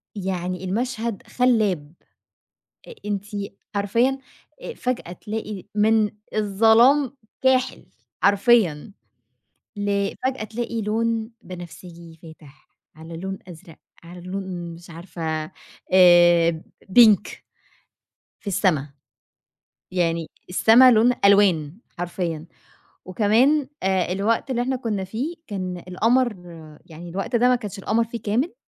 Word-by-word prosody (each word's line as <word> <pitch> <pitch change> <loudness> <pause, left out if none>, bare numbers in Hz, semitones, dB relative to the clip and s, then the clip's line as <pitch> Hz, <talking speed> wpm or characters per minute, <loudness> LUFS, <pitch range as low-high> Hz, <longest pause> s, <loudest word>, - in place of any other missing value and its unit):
يعني 185 -2 -4
المشهد 230 +2 -3
خلاب. 210 - +1 0.9
أ - - -9
أنتِ 205 +1 -4
أ 200 -1 -4 0.3
حرفيًا 230 +7 +1 0.6
فجأة 250 -8 -3
تلاقي 210 +1 -6
من 215 0 +3 0.3
الظلام 225 +7 +4 0.2
كاحِل 260 -1 +1 0.4
حرفيًا، 200 -4 +3 0.8
لفجأة 205 +5 -2
تلاقِي 230 +1 -4
لون 225 +1 -1
بنفسجي 170 -2 -11
فاتح 155 -4 -16 0.3
على 160 +1 -10
لون 190 +2 -5
أزرق 170 -2 -13 0.3
على 175 +1 -11
لون 185 -2 -6
مش 175 +2 -15
عارفة 160 -2 -5 0.4
آآ 175 -2 +6 0.5
pink. 215 -3 +5 1.0
في - - -27
السما، 175 -7 +1 1.0
يعني 170 -3 -1 0.2
السما 230 +7 +6
لون 230 +2 +4
ألوان 190 -6 +3 0.2
حرفيًا، 170 -3 -4 0.6
وكمان 235 +10 +2
آآ، 190 -2 0
الوقت 220 +7 -1
اللي 245 -1 0
إحنا 260 +1 -1
كنا 220 -6 -3
فيه 240 - -4
كان 185 -4 -5
القمَر 235 +5 +1 0.5
يعني 170 +1 -11
الوقت 195 +7 -2
ده 245 +2 +3
ما 250 - +4
كانش 210 -4 -8
القمَر 220 +4 0
فيه 230 -1 -8
كامل، 235 +10 -1
200 Hz, 105 wpm, -23 LUFS, 175-230 Hz, 1.0 s, آآ